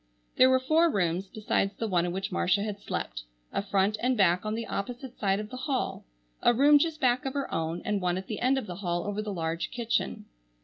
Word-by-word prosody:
There 255 - +7
were 260 0 +4
four 315 +6 +3
rooms 185 - 0
besides 205 -2 -1
the 225 - -3
one 175 -3 +1
in - - -2
which 195 +3 -3
Marcia 195 +3 +2
had 210 -1 -4
slept: - - -4 0.3
a - - 0
front 200 +1 +1
and 250 0 +1
back 180 -3 +3
on 215 - -1
the 230 0 -3
opposite 245 +4 -5
side 195 -1 +1
of 210 0 -6
the 255 - -6
hall, 255 0 -2 0.4
a 240 - +4
room 290 +4 +6
just 320 0 0
back 250 -2 +2
of 270 +1 -4
her 280 - -3
own, 165 +1 -2
and 210 -2 0
one 180 0 0
at 190 - -5
the 215 - -5
end 260 +2 +2
of 265 - -2
the 180 -3 -7
hall 175 -3 -2
over 205 +1 -2
the 215 -1 -4
large 165 -2 -2
kitchen. 235 - -2
210 Hz, 235 wpm, -28 LUFS, 185-255 Hz, 0.4 s, There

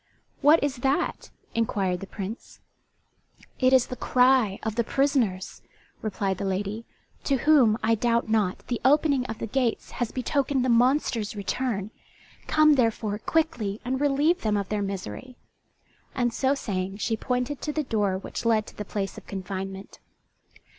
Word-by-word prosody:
"What 295 +2 +6
is 280 -2 -1
that?" 270 +3 -1 0.2
inquired 195 -5 0
the 195 - -8
Prince. 200 +3 -7 1.0
"It 255 -1 +4
is 260 -2 +5
the 250 - -6
cry 250 -5 +3
of 220 - -2
the 235 +2 +1
prisoners," 240 -8 0 0.4
replied 195 -3 -2
the - - -3
lady, 200 +4 -2 0.4
"to 275 - +2
whom, 255 -6 +4
I 225 +1 +3
doubt 235 +1 +1
not, 215 -4 0
the 245 - -3
opening 280 -1 +3
of 220 - -5
the - - -4
gates 240 +1 -1
has 240 - 0
betokened 265 0 0
the - - +1
monster's 240 -3 +2
return. 205 0 -2 0.6
Come, 305 -1 +5
therefore, 225 -5 0
quickly 225 -10 -1
and 260 +2 -1
relieve 290 +4 +2
them 210 -2 +1
of 200 -2 -3
their 210 -1 -1
misery." 195 - -6 0.8
And 240 -2 0
so 270 +3 +1
saying 195 -6 -3
she 225 +2 -1
pointed 250 +4 -2
to 300 - -2
the 305 0 -1
door 205 -7 0
which 190 - -6
led 225 -2 +2
to - - -13
the 210 - -5
place 195 -1 -4
of - - -25
confinement. 195 0 -6
230 Hz, 160 wpm, -26 LUFS, 200-265 Hz, 1.0 s, What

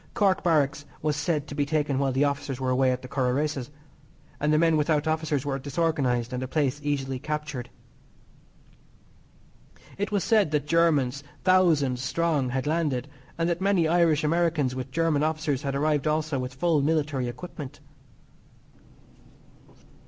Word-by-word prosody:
Cork 195 -3 +2
Barracks 150 -4 +1 0.2
was 150 -1 +1
said 150 -1 -1
to 145 - -8
be 145 0 0
taken 145 -2 0
while 135 -1 +1
the 135 +2 +2
officers 140 -2 -2
were 130 -1 -1
away 130 0 +3
at 125 0 -3
the - - -7
Curragh 125 -1 0
races, 145 -3 -2 0.7
that 150 - 0
the 155 - +4
men 165 0 +4
without 150 -1 +1
officers 155 -3 0
were 135 -1 -2
disorganised, 135 -5 0
and 125 - -2
the 130 - -3
place 145 0 0
easily 135 -3 -2
captured. 150 -3 -4 2.3
It 205 +1 -2
was 205 -2 +1
said 215 -7 +3
that 150 -1 0
Germans, 150 -5 +2 0.2
thousands 160 -9 +3
strong, 145 -1 0
had 130 +1 -2
landed, 150 -4 -1 0.3
and 165 0 0
that 175 +1 -1
many 190 -4 +3
Irish 165 -2 +3
Americans 160 -4 +1
with 130 0 -5
German 155 +1 +1
officers 155 -3 0
had 140 -1 -3
arrived 150 0 +1
also 155 -2 0
with 125 0 -5
full 160 +1 +2
military 145 -4 0
equipment. 145 +2 -8
150 Hz, 155 wpm, -26 LUFS, 135-160 Hz, 2.3 s, the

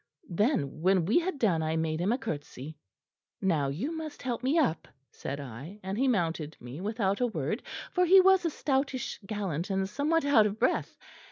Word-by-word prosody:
Then 170 - 0
when 185 -1 +3
we 215 - +4
had 355 -2 -3
done, 195 -11 +2
I 160 0 -1
made 160 -1 -1
him 190 +5 +1
a 245 - +2
curtsey. 155 - -6 0.6
"'Now 160 -7 +1
you 215 - -3
must 315 -2 -7
help 245 -2 -2
me 270 +6 +1
up,' 255 - +1 0.2
said 140 +1 -5
I, 140 - -8
and 190 +1 -3
he 265 +5 +1
mounted 165 - -1
me 125 +7 -8
without 205 0 -1
a 245 - +3
word, 165 - -2 0.3
for 360 - +2
he 370 +2 +7
was 380 0 +5
a 335 - +1
stoutish 270 -3 -1
gallant 190 -6 -3
and 190 0 0
somewhat 300 +8 0
out 235 -7 +5
of 205 +1 -5
breath. 250 +3 0
205 Hz, 190 wpm, -29 LUFS, 160-270 Hz, 0.6 s, he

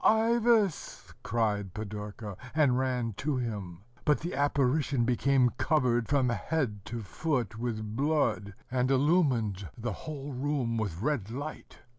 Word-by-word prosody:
"Ivas!" 225 -3 +2
cried 105 -4 -1
Pidorka, 105 -1 -6 0.2
and 145 -5 +4
ran 125 -3 0
to 140 +1 -1
him; 100 -7 -4 0.2
but 150 -5 +2
the 175 +3 -3
apparition 140 -2 +2
became 125 +1 +3
covered 125 -6 +2
from 135 -3 +3
head 120 -5 -1
to 120 -2 -5
foot 115 - -2
with 110 -3 -3
blood, 140 -8 +1 0.2
and 125 0 +1
illumined 130 - +2
the 115 -2 -3
whole 145 +1 -6
room 130 -3 -1
with 100 -3 -3
red 135 -8 0
light. 145 +6 -7
125 Hz, 130 wpm, -30 LUFS, 110-145 Hz, 0.2 s, and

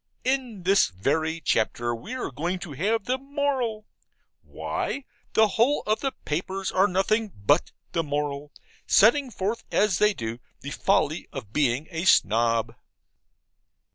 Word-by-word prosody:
In 250 -7 -1
this 195 +2 +4
very 155 - -1
chapter 120 -3 0
we 120 - -6
are 255 - -4
going 170 +8 -2
to 175 -3 -8
have 200 - 0
the 255 +1 0
moral 270 -6 -2 0.6
why, 275 - -4 0.3
the 220 -1 +5
whole 235 +9 +2
of 215 +1 +1
the 270 - -1
papers 190 +5 -2
are 190 +2 +4
nothing 205 +3 +1
BUT 145 - +2 0.2
the 170 - +1
moral, 145 -1 -3 0.4
setting 255 +6 +5
forth 210 +1 -3
as 205 -3 +2
they 210 -1 +4
do 115 +1 -5 0.2
the 140 - -6
folly 155 +2 +1
of 115 -7 -8
being 140 0 +1
a 165 +1 -3
Snob. 115 - +3
185 Hz, 140 wpm, -26 LUFS, 140-220 Hz, 0.6 s, the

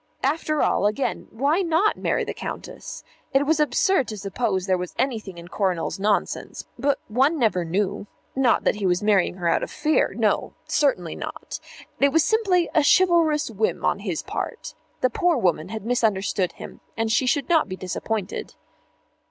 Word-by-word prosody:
After 305 +2 +1
all, 205 - +2
again, 215 +6 -2
why 285 - +1
not 345 +4 +2
marry - - 0
the - - -4
Countess? - - -7 0.3
It 275 +1 +4
was 315 +1 +2
absurd 300 - +2
to 215 - -5
suppose 195 -1 -1
there 190 - +2
was 180 -1 -6
anything 225 -8 -2
in 170 0 -10
Coronel's 185 -2 -1
nonsense, 205 +1 -1
but 285 0 +2
one 270 +9 +2
never 215 - +2
knew. 200 +4 -2 0.3
Not 260 -2 +3
that - - +1
he 200 -2 0
was 180 +2 +1
marrying 200 -4 +3
her 175 -2 -2
out - - +2
of - - -4
fear. 305 +1 +1
No; - - +1
certainly 215 - +1
not. - - -6 0.4
It 280 0 +4
was 325 +1 +4
simply 375 -4 +2
a 315 - +4
chivalrous 325 -5 +4
whim 215 0 -1
on - - +1
his 185 -6 -3
part. - - -5 0.3
The 255 - +2
poor 350 +5 +2
woman 180 -6 0
had 220 -1 -6
misunderstood 205 -6 0
him, - - -10 0.2
and 225 0 0
she 255 +4 +2
should 265 +2 +1
not 325 -10 +3
be 185 - -4
disappointed. 190 +3 -4
225 Hz, 175 wpm, -24 LUFS, 195-300 Hz, 0.4 s, It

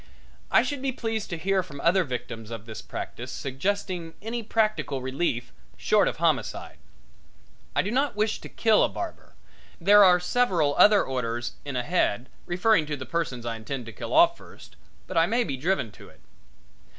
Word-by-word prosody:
I - - +5
should 285 -3 -3
be 270 -1 0
pleased 225 -3 -3
to 170 - -3
hear 190 +3 +1
from 150 -6 -10
other 185 +2 +3
victims 120 -5 -6
of 115 -2 -7
this 110 -1 -8
practice 125 +2 -7
suggesting 170 +5 -3
any 230 +3 -4
practical 215 -10 0
relief 130 - -2 0.2
short - - +3
of - - -2
homicide. - - -1 1.0
I - - +3
do 205 - -3
not 270 0 +1
wish 215 +1 0
to - - -9
kill 220 -2 +3
a - - +2
barber 345 -2 -7 0.4
there 205 +4 +7
are 180 -2 +6
several 180 -7 +1
other 205 -1 +7
orders 120 -2 -3
in 140 -2 -5
ahead, 125 - 0 0.2
referring 180 -2 +2
to 150 -1 -3
the 130 - -7
persons 135 -8 -3
I 115 -1 -2
intend 125 +3 -5
to 115 - -9
kill - - -7
off 340 +1 +6
first - - -15 0.3
but - - -5
I 165 +1 +5
may 235 +3 +2
be 140 - -3
driven 140 - -1
to - - -14
it. - - -21
170 Hz, 180 wpm, -26 LUFS, 130-210 Hz, 1.0 s, there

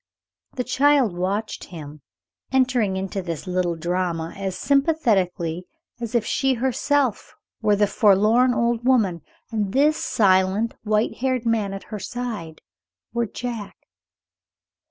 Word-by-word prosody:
The 250 - -1
child 265 -5 +3
watched 195 +5 -2
him, 150 -4 -10 0.5
entering 250 -7 +2
into 195 +1 -3
this 170 -5 -5
little 180 -2 0
drama 170 -1 -2
as 190 -1 -4
sympathetically 200 - +1 0.3
as 235 0 -5
if 230 -2 +2
she 270 +2 +1
herself 260 0 0 0.3
were 210 -2 +3
the 205 +1 +3
forlorn 215 +4 +4
old 235 0 0
woman, 215 -10 +2 0.3
and 210 -3 -1
this 295 +3 +3
silent, 195 +2 +2
white 215 0 0
haired 255 -2 -1
man 220 -4 +1
at 195 0 -6
her 210 - -3
side 205 -7 -5 0.5
were 235 -1 0
Jack. 230 -2 -6
215 Hz, 125 wpm, -23 LUFS, 185-245 Hz, 0.5 s, forlorn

